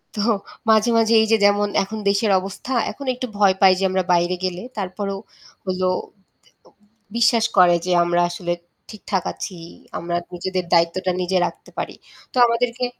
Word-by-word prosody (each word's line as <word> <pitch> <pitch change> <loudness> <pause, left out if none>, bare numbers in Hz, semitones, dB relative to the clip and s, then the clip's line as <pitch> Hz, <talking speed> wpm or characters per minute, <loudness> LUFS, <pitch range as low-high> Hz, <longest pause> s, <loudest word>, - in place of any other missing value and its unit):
তো 205 - -1 0.5
মাঝে, 220 +1 +4
মাঝে 225 0 +3
এইযে 220 0 +3
যেমন 205 0 +3 0.2
এখন 220 +3 -6
দেশের 200 +1 +2
অবস্থা 195 +7 -6 0.2
এখন 280 - -9
একটু 255 0 -4
ভয় 195 -2 +4
পাই 190 -1 +7
যে - - -2
আমরা 185 0 0
বাইরে 175 +1 +2
গেলে 180 -1 -3 0.2
তারপরেও 195 0 -4 0.5
হল 185 0 -3 0.7
এ - - -34 0.7
বিশ্বাস 235 -1 +3
করে 175 -1 +7
যে 180 - -1
আমরা 175 0 +2
আসলে 175 0 -3 0.4
ঠিকঠাক 200 -3 -3
আছি। 185 -4 -7 0.4
আমরা 175 0 -2 0.2
নিজেদের 185 0 -3
দায়িত্বটা 170 +2 +2
নিজে 185 +1 0
রাখতে - - -11
পারি। - - -4 0.4
তো - - -5
আমাদেরকে 235 +1 -1
195 Hz, 155 wpm, -21 LUFS, 180-220 Hz, 0.7 s, পাই